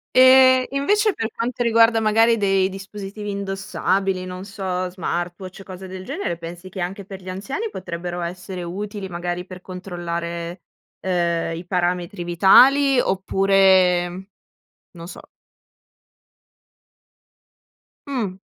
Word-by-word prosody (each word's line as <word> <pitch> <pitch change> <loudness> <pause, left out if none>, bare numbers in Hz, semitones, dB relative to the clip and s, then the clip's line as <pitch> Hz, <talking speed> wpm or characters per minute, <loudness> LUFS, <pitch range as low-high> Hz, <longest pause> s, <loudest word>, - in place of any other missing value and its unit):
E 260 0 +7
invece, 415 +9 +2
per 225 0 -3
quanto 240 +1 -2
riguarda 230 0 +4
magari 225 +1 +3
dei 195 -2 +2
dispositivi 200 +1 -7
indossabili, 195 -1 -1
non 185 +1 -7
so, 190 -3 -3
smartwatch 180 +1 -5
o - - -10
cose 190 0 -9
del 185 0 -8
genere, 275 - -3
pensi 170 +2 -9
che 185 0 -6
anche 190 +3 -4
per 195 0 -9
gli 185 0 -10
anziani 270 - -4
potrebbero 175 -1 -5
essere 180 +2 -6
utili, 200 +3 -5
magari 175 0 -4
per 180 0 -11
controllare, 175 -2 -5 0.4
ehm, 170 -2 -1
i 175 - -8
parametri 180 +1 -1
vitali 255 +11 +5
oppure 190 -2 +2 0.6
non 170 -1 -10
so. - - -11 2.8
Mh. 235 -10 -3
190 Hz, 115 wpm, -22 LUFS, 175-210 Hz, 2.8 s, E